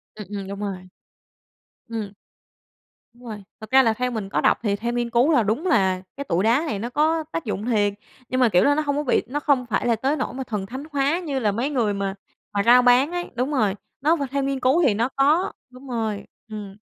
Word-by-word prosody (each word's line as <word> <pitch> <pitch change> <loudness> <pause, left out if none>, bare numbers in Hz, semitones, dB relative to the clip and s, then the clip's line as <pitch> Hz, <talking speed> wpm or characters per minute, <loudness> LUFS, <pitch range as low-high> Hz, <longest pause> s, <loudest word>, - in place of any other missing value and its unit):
Ừm, 210 -3 -9
ừm, 200 -2 -5
đúng 200 0 -6
rồi. 190 -3 -5 1.0
Ừm. 215 -3 -4 1.0
Đúng 245 - -20
rồi, 215 -3 -7 0.2
thực 220 - -10
ra 265 0 +7
là 225 -2 +3
theo 250 +3 -2
mình 215 -4 -4
có - - 0
đọc - - +3
thì 200 -2 +1
theo 235 +3 -3
nghiên 240 -1 -1
cứu 240 +7 +3
là 250 -6 +4
đúng 220 - -1
là 190 - +2 0.2
cái 280 - -3
tụi 180 -7 0
đá 235 +8 +3
này 210 - -2
nó 235 +4 -4
có 315 +5 +1
tác 330 -5 -4
dụng 210 0 -3
thiệt, 205 -4 +1 0.4
nhưng 255 - 0
mà, 245 - +5
kiểu 180 -2 +4
là, 285 - +4
nó 310 - +1
hông 285 -1 -1
có 295 - -1
bị 255 - +2
nó 285 +4 -2
không 280 -4 +1
phải 235 - -1
là 235 - +3
tới 270 +6 0
nỗi 305 - -3
mà 265 +1 -4
thần 210 -6 -4
thánh 260 +7 -7
hóa 285 +4 +1
như 295 -7 -3
là 215 -5 +1
mấy 235 +7 -1
người 235 -8 0
mà 195 -1 -3 0.4
mà 200 -1 +1
rao 245 +2 +7
bán 250 +5 +4
ấy. 350 0 -4
Đúng 255 +4 -1
rồi, 215 -9 +1 0.3
nó 310 +4 +3
v 315 - -6
theo 280 0 0
nghiên 275 0 -1
cứu 265 +7 +3
thì 260 -8 +4
nó 230 +5 0
có 300 +6 +3 0.2
đúng 255 +2 -14
rồi, 220 -4 -2 0.2
ừm. 205 -3 -7
240 Hz, 250 wpm, -23 LUFS, 210-275 Hz, 1.0 s, ra